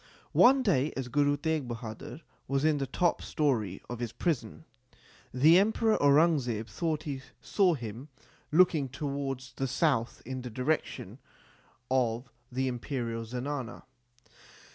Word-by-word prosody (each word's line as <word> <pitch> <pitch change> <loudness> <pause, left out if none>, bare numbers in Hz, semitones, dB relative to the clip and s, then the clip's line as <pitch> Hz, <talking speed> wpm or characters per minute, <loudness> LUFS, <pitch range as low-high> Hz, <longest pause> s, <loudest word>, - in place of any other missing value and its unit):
One 265 +1 +6
day, 155 - +2
as 130 -2 -3
Guru 145 +2 +2
Teg 160 -4 -1
Bahadur 115 +5 -7 0.3
was 135 +2 0
in 155 -2 +3
the 135 - -2
top 175 +5 +1
story 115 - -1
of 120 -1 -6
his 120 -2 -3
prison, 165 -2 -2 0.7
the 155 +8 +6
Emperor 220 +2 +2
Aurangzeb 140 -7 +3
thought 160 0 -2
he 140 -3 -4 0.2
saw 185 -5 +2
him 120 +1 -7 0.4
looking 155 -4 +4
towards 135 -1 -4
the 135 - -2
south 130 -3 0
in 130 +1 -5
the 125 - -6
direction 130 +7 -2 0.7
of 125 -1 0 0.2
the 130 +1 -1
Imperial 120 -2 -3
zenana. 125 +1 -5
135 Hz, 130 wpm, -30 LUFS, 120-155 Hz, 0.7 s, One